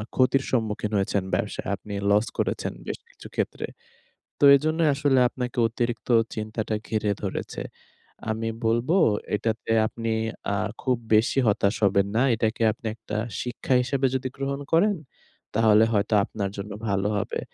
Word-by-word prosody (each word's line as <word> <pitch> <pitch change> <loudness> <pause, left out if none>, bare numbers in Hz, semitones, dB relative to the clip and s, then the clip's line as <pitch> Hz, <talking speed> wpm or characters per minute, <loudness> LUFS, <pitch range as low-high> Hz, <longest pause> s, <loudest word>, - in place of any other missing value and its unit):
ক্ষতির 135 +1 +3
সম্মুখীন 110 -3 -1
হয়েছেন 100 0 0
ব্যবসায় - - -3
আপনি 105 - -9 0.2
লস 105 +2 +4
করেছেন - - -1
বেশ - - -4
কিছু - - -13
ক্ষেত্রে। - - -2 0.7
তো - - +2
এজন্যই 155 +2 +1
আসলে 140 -2 +2
আপনাকে 125 -1 -5
অতিরিক্ত 120 +1 -3 0.3
চিন্তাটা 110 0 -3
ঘিরে 110 -2 0
ধরেছে। 100 -2 -4 0.7
আমি 115 +1 -2 0.2
বলবো, 120 +10 +2 0.4
"এটাতে 110 +1 -2
আপনি 115 0 -3 0.4
আর 105 +2 -1
খুব 130 -2 +2 0.2
বেশি 110 +5 +3
হতাশ 100 0 +2
হবেন 100 0 +3
না। 120 - +4
এটাকে 110 +1 -1
আপনি 115 +1 -10
একটা 105 - -6 0.3
শিক্ষা 125 +2 -1
হিসেবে 135 +1 0
যদি 130 0 -1
গ্রহণ 140 +1 -3
করেন, 200 +5 +4 0.6
তাহলে 110 0 +5
হয়তো 105 0 +1
আপনার 100 -3 -4
জন্য 100 +1 -6 0.2
ভালো 100 0 +1
হবে।" 100 - -2
115 Hz, 145 wpm, -25 LUFS, 105-130 Hz, 0.7 s, তাহলে